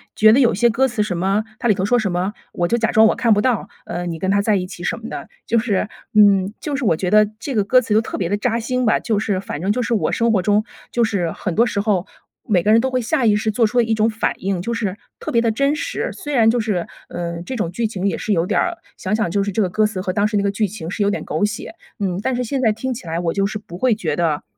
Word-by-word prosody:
觉 215 0 +6
得 240 - +5
有 240 -4 +4
些 235 +4 +3
歌 255 +4 +2
词 240 -4 -2
什 210 -4 -3
么 195 +4 +1 0.2
它 240 - 0
里 215 - +5
头 190 -1 -2
说 245 +4 +3
什 205 -4 -1
么， 180 +3 -1 0.2
“我 175 - 0
就 235 - +1
假 225 -1 +1
装 220 0 +6
我 - - +2
看 230 -3 +3
不 205 - +2
到， 245 -3 0 0.2
呃， 175 +1 -4
你 165 -1 -4
跟 190 - -1
他 200 - +3
在 210 0 +2
一 185 -2 -1
起 180 -2 -9
什 235 - -1
么 230 +1 -8
的”。 - - -6 0.2
就 230 - +2
是 210 -3 -1 0.3
嗯， 200 -2 +5
就 295 - -3
是 270 -2 -2
我 170 - +3
觉 180 +3 -2
得 215 0 +6
这 265 +3 -4
个 210 - +3
歌 255 +5 +4
词 225 -3 -2
就 220 - +5
特 - - -5
别 175 -3 -1
地 205 - +1
扎 230 +2 0
心 250 +2 -1
吧， 220 - +3
就 220 -3 -1
是 205 -3 -1
反 185 -6 -6
正 190 +3 +1
就 250 - 0
是 240 0 -1
我 210 - 0
生 230 0 +2
活 205 -4 +2
中 210 +2 +3 0.3
就 240 - +1
是， 195 -7 0
很 180 +1 -4
多 230 - +4
时 210 - -2
候， 200 -4 +1 0.4
每 185 -5 +3
个 210 - +3
人 225 - +6
都 260 +1 -1
会 255 -1 0
下 255 +2 0
意 210 -2 +4
识 215 +1 0
做 225 +2 +2
出 245 +3 0
的 - - +5
一 225 0 0
种 215 0 +2
反 225 +1 -1
应。 190 -1 -2
就 235 +6 -3
是， 205 -5 -2 0.2
特 - - -5
别 235 - +3
地 230 - +2
真 275 +6 +1
实 - - -3
虽 295 - -6
然 225 -3 +5
就 240 - 0
是， 210 -6 -1 0.2
嗯， 170 -1 -4
这 260 - -4
种 190 -8 -2
剧 225 +5 -1
情 195 -3 -4
也 190 - 0
是 - - -3
有 170 -4 +2
点 - - +1
儿 350 -1 -1 0.2
想 190 +2 -2
想 215 -5 0
就 200 +2 +1
是 200 - -2
这 215 - 0
个 185 - -1
歌 215 +3 +2
词 210 -3 -5
和 185 -1 -2
当 205 +2 +2
时 215 -1 -1
那 200 - +1
个 200 - +1
剧 210 +1 0
情 185 -4 -7
是 210 - -3
有 200 - +3
点 205 - -2
狗 - - -2
血， 210 +9 -5 0.3
嗯， 190 -3 -1
但 255 +3 -1
是 250 - -1
现 260 +3 -2
在 225 -4 +4
听 255 +5 -3
起 225 -7 -9
来 165 +1 -2
我 170 -1 -1
就 195 0 +1
是 215 - -4
不 175 -4 -10
会 245 +3 +2
觉 165 -9 -2
得 160 -3 0
210 Hz, 335 characters per minute, -20 LUFS, 190-230 Hz, 0.4 s, 觉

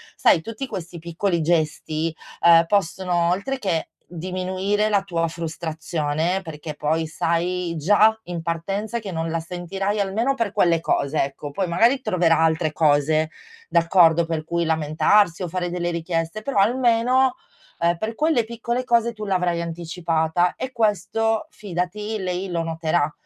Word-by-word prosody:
Sai, 165 - +4
tutti 225 +8 -6
questi 180 -7 -7
piccoli 170 +2 -1
gesti, 155 0 0 0.3
uhm, 170 0 +7
possono, 175 -2 +1
oltre 200 +10 -1
che 180 -8 -1 0.2
diminuire 185 +4 -2
la 205 -2 +3
tua 170 -4 -1
frustrazione 160 +1 -2
perché 155 -2 -7
poi 160 +2 -1
sai 170 +2 -1
già 205 +7 +4
in 175 -2 -5
partenza 195 +7 -2
che 205 -4 -7
non 165 -1 -3
la 165 - -1
sentirai 185 +5 -3
almeno 220 +7 0
per 230 -5 -1
quelle 170 -5 +2
cose, 140 -1 +1
ecco. 140 +1 -6
Poi 185 +6 -2
magari 230 +10 +3
troverà 175 -7 +2
altre 160 -1 +1
cose, 155 +1 +2 0.4
d'accordo, 170 -1 +4
per 160 -1 -2
cui 170 +1 -1
lamentarsi 160 +4 +2
o 180 - -2
fare 175 +1 -3
delle 175 -1 -2
richieste, 170 +3 -3
però 270 -5 0
almeno, 245 +3 +3 0.4
ehm, 170 0 +2
per 220 +5 -3
quelle 300 -2 +2
piccole 235 +2 -3
cose, 235 -2 +2
tu 215 -1 -7
l'avrai 180 -3 0
anticipata 170 0 -1
e 260 - -4
questo, 225 +2 0
fidati, 210 - -4
lei 185 0 -3
lo 170 -1 0
noterà 160 -1 0
175 Hz, 145 wpm, -23 LUFS, 165-205 Hz, 0.4 s, uhm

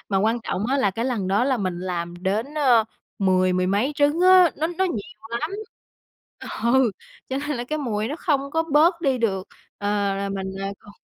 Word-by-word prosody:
Mà 195 -2 +1
quan 225 +4 +1
trọng 205 +2 -2
á 275 - +2
là 205 -8 +2
cái 230 +5 -3
lần 220 -8 -1
đó 205 +5 +2
là 260 -1 +1
mình 185 -4 -2
làm 175 -2 -3
đến, 220 +10 -1
ờ, 250 -7 +4 0.3
mười 185 -1 +3
mười 185 0 +1
mấy 210 +10 +1
trứng 290 +4 +2
á, 370 -2 +7
nó 315 - 0
nó 350 +2 -1
nhiều 220 - -5
lắm. 310 - -2 1.1
Ừ, 240 0 +4 0.4
cho 265 - -2
nên 290 -1 -3
là 240 - -3
cái 305 +5 -3
mùi 220 -5 -2
nó 295 - -4
không 280 -5 0
có 325 +2 +1
bớt 335 +4 +4
đi 270 -6 +1
được, 195 -4 -1 0.3
ờ, 205 - -4 0.3
là 200 0 -2
mình 195 -1 -4 0.3
còn 205 - -15
235 Hz, 205 wpm, -23 LUFS, 195-290 Hz, 1.1 s, á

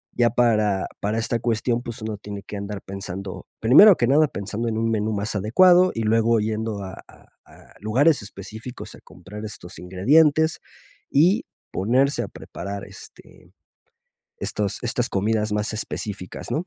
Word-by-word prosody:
ya 120 -1 +3
para 110 -5 +2
para 105 +2 -1
esta 115 +1 -1
cuestión 120 +1 0
pues 120 -2 -8
uno 110 -1 -4
tiene 100 -1 -8
que 105 - -8
andar 100 0 -5
pensando. 95 -1 -7
Primero 180 - +8
que 120 - +1
nada 150 +3 +4
pensando 105 +4 -4
en 110 - -2
un 115 0 0
menú 110 0 0
más 105 +1 -3
adecuado 180 - +5
y 115 - -3
luego 115 +1 +3
yendo 110 -1 -2
a 95 0 -7 0.2
a - - -19 0.2
a - - -19
lugares 135 +7 +3
específicos 110 +5 -9
a - - -17
comprar 100 +5 -11
estos 90 -4 -9
ingredientes 150 - +3 0.5
y 185 - +3 0.3
ponerse 130 +8 +1
a - - -5
preparar, 100 +3 -7
este, - - -14 0.9
estos 105 -2 -2
estas 120 +1 -1
comidas 105 +2 0
más 105 +1 -1
específicas, 100 -3 -5
¿no? 165 +4 -2
110 Hz, 155 wpm, -23 LUFS, 100-120 Hz, 0.9 s, Primero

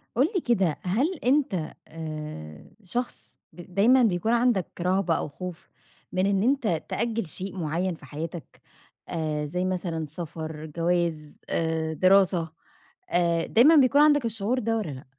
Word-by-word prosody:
قُل 255 +4 +4
لي 370 - +2
كده، 195 - +1
هل 255 - +1
أنت 245 - +1
آآ 155 - -8
شخص 240 +7 -5
ب 175 0 -12
دايمًا 245 +7 +5
بيكون 210 0 +1
عندك 235 -6 +2
رهبة 180 -1 +1
أو - - -3
خوف 180 +3 -8 0.4
من 185 +1 +1
إن 200 0 +2
أنت 235 - +1
تأجّل 230 -3 -1
شيء 190 +4 -6
معيّن 170 +2 -1
في 160 - -15
حياتك 160 +4 -7 0.5
آآ 155 -2 -2
زي 180 +5 -2
مثلًا 175 -3 -2
سَفَر، 160 0 -6
جَواز، 165 -1 -1
آآ 160 -1 -1
دراسة، 185 -1 +3 0.6
آآ، 170 -1 +2
دايمًا 290 +8 +6
بيكون 280 0 +5
عندك 295 -3 +5
الشعور 225 +2 -1
ده 225 -1 0
والّا 215 -8 -2
لأ؟ 130 -1 -8
180 Hz, 145 wpm, -26 LUFS, 160-225 Hz, 0.6 s, دايمًا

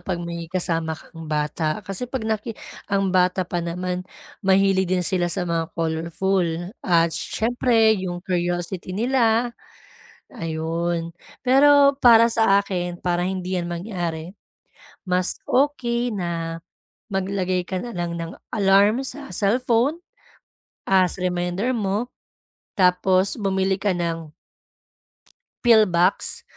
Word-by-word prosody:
'pag 175 -1 -3
may 170 -1 -6
kasama 165 -3 -1
kang 165 -2 -11
bata 155 +2 -1
kasi 195 +6 -4
'pag 250 -5 -3
naki 220 +1 -3 0.3
ang 195 -1 +1
bata 180 0 +2
pa 175 -1 -2
naman 180 +1 -3 0.4
mahilig 190 -1 +3
din 180 -1 +1
sila 175 -2 0
sa 180 -1 -2
mga 165 -1 -1
colorful, 170 +2 -1
at 170 -2 +3
siyempre 230 -1 +2
yung 175 -1 -3
curiosity 175 0 -2
nila, 235 0 +2 0.8
ayun. 165 -2 -3 0.3
Pero, 280 +2 +5
para 230 -3 +6
sa 220 -4 +4
akin, 180 -3 -4
para 175 -1 0
hindi 185 0 -2
yan 175 -1 -3
mangyari, 175 -2 -4 0.7
mas 180 0 0
okey 245 -3 +1
na 165 -3 -3 0.5
maglagay 185 -1 -1
ka 185 - -2
na 240 - -6
lang 175 -1 -3
ng 165 0 -5 0.2
alarm, 200 +4 +4
sa 275 +1 -8
cellphone, 245 +8 +1 0.9
as 190 -1 +3
reminder 180 +5 -1
mo, 210 +2 -1 0.7
tapos 185 +1 +3
bumili 190 -2 0
ka 200 0 0
ng 165 -3 -3 1.3
pill 225 -3 +6
box 175 +2 +1
185 Hz, 115 wpm, -23 LUFS, 175-220 Hz, 1.3 s, para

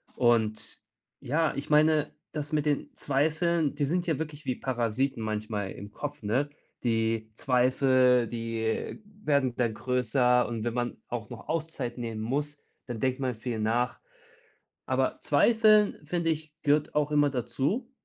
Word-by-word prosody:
Und 115 -3 +1 0.4
ja, 155 +5 +1
ich 140 - -5
meine, 155 0 +4 0.2
das 150 -1 -4
mit 150 -1 +1
den 145 -2 -1
Zweifeln 155 +2 +1
die 145 - +1
sind 175 +4 0
ja 160 -3 0
wirklich 155 -1 -5
wie 125 - 0
Parasiten 125 0 -1
manchmal 105 -2 -3
im 100 +1 -9
Kopf, 145 +1 -6
ne? 130 +8 +1 0.3
Die 115 -1 0
Zweifel, 125 -1 +3
die 115 - -3 0.2
werden 140 -5 +2
dann 120 -3 0
größer 125 0 +2
und 115 -2 -4
wenn 120 - -1
man 120 0 -2
auch 115 -3 -5
noch 120 -2 -10
Auszeit 155 -7 -3
nehmen 115 -2 -4
muss, 145 +5 -2 0.2
dann 120 -3 -5
denkt 130 0 0
man 130 -1 0
viel 115 0 -4
nach. 115 +3 0 0.9
Aber - - 0
zweifeln 215 -2 +4
finde 170 0 0
ich 155 -1 -4
gehört 150 0 +2
auch 150 0 +1
immer 145 -1 +4
dazu, 145 - -1
130 Hz, 150 wpm, -28 LUFS, 115-150 Hz, 0.9 s, meine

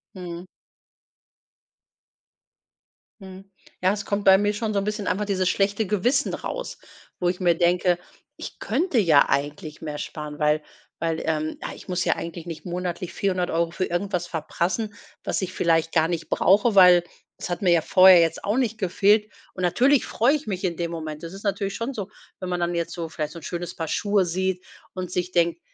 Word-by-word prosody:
Mhm. 175 -1 -7 2.8
Mhm. 190 0 -11 0.4
Ja 185 +2 +4
es 205 -1 -5
kommt 200 0 -2
bei 190 0 +8
mir 205 0 +2
schon 215 0 -2
so 200 - +2
'n - - -2
bisschen 210 -1 -3
einfach 210 +2 0
dieses 190 -2 0
schlechte 200 +3 +1
Gewissen 210 +6 +1
raus, - - -5 0.4
wo 175 - +1
ich 180 - -3
mir 175 -3 +3
denke, 175 +1 +2 0.4
ich - - -9
könnte 340 -8 0
ja 165 -9 +5
eigentlich 145 +2 -2
mehr 150 -2 -5
sparen, 150 -1 -6
weil 150 0 +2 0.4
weil, 165 -1 -1
ähm, 155 -1 -1
ja - - -5
ich - - -14
muss 180 0 -1
ja - - +2
eigentlich 170 0 -7
nicht 165 - -7
monatlich 180 0 -4
400 185 -3 -1
Euro 165 0 +1
für 185 +2 -2
irgendwas 180 0 -2
verprassen, 180 +6 -2 0.3
was - - -2
ich 185 - -3
vielleicht 165 -2 +1
gar 160 -1 +3
nicht 165 -1 -4
brauche, 205 +4 +3
weil 180 -2 +8 0.3
es - - -6
hat 175 - -3
mir 180 - +4
ja 170 -2 +4
vorher 185 0 +7
jetzt 165 -1 +1
auch 205 +4 0
nicht 230 -4 0
gefehlt 205 +3 +2 0.2
und 185 - -7
natürlich 255 +10 +3
freue 240 +5 +2
ich 300 - -5
mich 190 -2 -3
in 175 -3 -1
dem 170 -1 -2
Moment. 155 -2 -6
Das 165 - -7
ist 195 +2 -10
natürlich 200 -1 -1
schon 230 +4 -3
so, 205 -3 -5 0.3
wenn 185 -1 -5
man 180 - -1
dann 175 0 0
jetzt 170 -1 -2
so 170 -2 -4
vielleicht 150 -1 -4
so 170 - -8
'n 155 - -18
schönes 175 0 -5
Paar 165 -1 -4
Schuhe 205 +1 +1
sieht 185 +1 -2 0.3
und 180 -2 -5
sich 180 0 -2
denkt: 170 -1 +1
180 Hz, 200 wpm, -24 LUFS, 170-200 Hz, 2.8 s, bei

